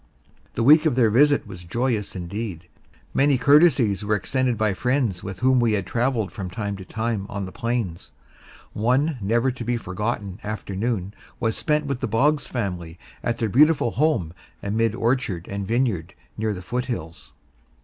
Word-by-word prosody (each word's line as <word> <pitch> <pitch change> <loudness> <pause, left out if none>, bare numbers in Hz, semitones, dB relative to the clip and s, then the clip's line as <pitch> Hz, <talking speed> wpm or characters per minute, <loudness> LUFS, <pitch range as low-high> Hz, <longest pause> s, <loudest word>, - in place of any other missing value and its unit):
The 115 - 0
week 155 +5 +7
of 145 - +1
their 115 -4 +4
visit 145 +5 +4
was 90 -4 -10
joyous 110 +3 -1
indeed. 90 -1 -5 0.5
Many 140 -1 +3
courtesies 130 - +4
were 105 +1 +1
extended 125 +4 0
by 110 -1 +1
friends 125 -4 0
with 95 +1 -7
whom 130 0 +4
we 115 -2 +2
had 100 -3 0
travelled 120 -2 0
from 95 -6 -6
time 100 +2 -3
to 95 - -8
time 110 0 -3
on 100 -1 -4
the 95 - -8
plains. 115 -8 -3 0.6
One 130 +6 +1
never 115 +6 +2
to 120 -1 -7
be 120 +1 0
forgotten 100 -1 -4
afternoon 105 -1 -3 0.3
was 110 -2 0
spent 150 -1 0
with 140 -3 -2
the - - -2
Boggs 145 +7 +2
family 90 -8 -4 0.3
at 120 0 -1
their 115 - 0
beautiful 145 +1 +4
home 130 - +1 0.3
amid 110 +2 0
orchard 115 -8 0
and 100 -1 -4
vineyard 110 -7 0 0.2
near 110 0 -1
the 90 - -8
foothills. 120 -8 -5
115 Hz, 165 wpm, -24 LUFS, 100-125 Hz, 0.6 s, week